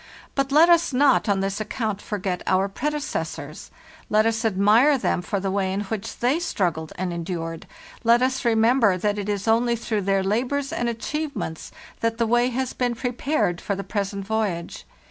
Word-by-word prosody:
But 275 Hz, 0 st, -1 dB
let 310 Hz, +4 st, +7 dB
us 340 Hz, -4 st, +4 dB
not 265 Hz, -3 st, +3 dB
on 195 Hz, -1 st, +2 dB
this 195 Hz, +2 st, -2 dB
account 215 Hz, -1 st, -3 dB
forget 190 Hz, -3 st, -3 dB
our 190 Hz, +1 st, +2 dB
predecessors; 195 Hz, -, -4 dB, 0.4 s
let 215 Hz, +1 st, +3 dB
us 225 Hz, 0 st, 0 dB
admire 220 Hz, +7 st, +4 dB
them 205 Hz, -, 0 dB
for 200 Hz, +2 st, -2 dB
the 195 Hz, 0 st, -2 dB
way 190 Hz, -1 st, 0 dB
in 195 Hz, +2 st, -1 dB
which 210 Hz, +1 st, -5 dB
they 255 Hz, +7 st, +1 dB
struggled 170 Hz, -, -2 dB
and 180 Hz, -1 st, -3 dB
endured; 165 Hz, -1 st, -5 dB, 0.4 s
let 235 Hz, +1 st, +4 dB
us 260 Hz, +1 st, 0 dB
remember 225 Hz, -3 st, +3 dB
that 205 Hz, +2 st, -1 dB
it 205 Hz, 0 st, -4 dB
is 205 Hz, 0 st, -2 dB
only 235 Hz, +2 st, +3 dB
through 220 Hz, -2 st, -2 dB
their 195 Hz, 0 st, +1 dB
labors 260 Hz, +8 st, -1 dB
and 240 Hz, -7 st, -1 dB
achievements 255 Hz, -, -4 dB, 0.3 s
that 230 Hz, 0 st, -1 dB
the 235 Hz, -, +1 dB
way 240 Hz, +2 st, +3 dB
has 255 Hz, +1 st, -2 dB
been 245 Hz, -1 st, -1 dB
prepared 245 Hz, -, -1 dB
for 200 Hz, -, -2 dB
the 195 Hz, -, -5 dB
present 200 Hz, -1 st, -3 dB
voyage. 205 Hz, -5 st, -3 dB
220 Hz, 180 wpm, -24 LUFS, 195-245 Hz, 0.4 s, let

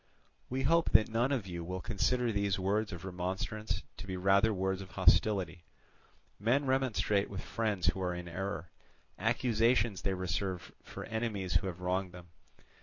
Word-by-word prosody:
"We 130 Hz, +1 st, -1 dB
hope 165 Hz, +5 st, +3 dB
that 110 Hz, -, +6 dB
none 120 Hz, +4 st, +1 dB
of 125 Hz, -8 st, 0 dB
you 85 Hz, -2 st, -5 dB
will 90 Hz, +2 st, -4 dB
consider 120 Hz, +5 st, +1 dB
these 100 Hz, -2 st, +1 dB
words 100 Hz, +3 st, 0 dB
of 90 Hz, -1 st, -7 dB
remonstrance 95 Hz, +4 st, -3 dB
to 90 Hz, +1 st, -8 dB
be 95 Hz, -1 st, -3 dB
rather 100 Hz, +4 st, +4 dB
words 95 Hz, -1 st, -1 dB
of 95 Hz, -, -9 dB
hostility; 95 Hz, -2 st, +3 dB, 0.8 s
men 125 Hz, +8 st, +2 dB
remonstrate 130 Hz, -6 st, +1 dB
with 95 Hz, -2 st, -6 dB
friends 105 Hz, -6 st, -1 dB
who 95 Hz, -, +1 dB
are 90 Hz, -1 st, -1 dB
in 90 Hz, 0 st, -6 dB
error, 90 Hz, -1 st, -4 dB, 0.5 s
accusations 115 Hz, -1 st, +2 dB
they 95 Hz, -1 st, 0 dB
reserve 90 Hz, 0 st, -3 dB
for -, -, -8 dB
enemies 110 Hz, -5 st, -2 dB
who 90 Hz, +3 st, +2 dB
have 90 Hz, -1 st, -6 dB
wronged 90 Hz, 0 st, -1 dB
them. 90 Hz, -1 st, -12 dB
95 Hz, 165 wpm, -32 LUFS, 90-110 Hz, 0.8 s, that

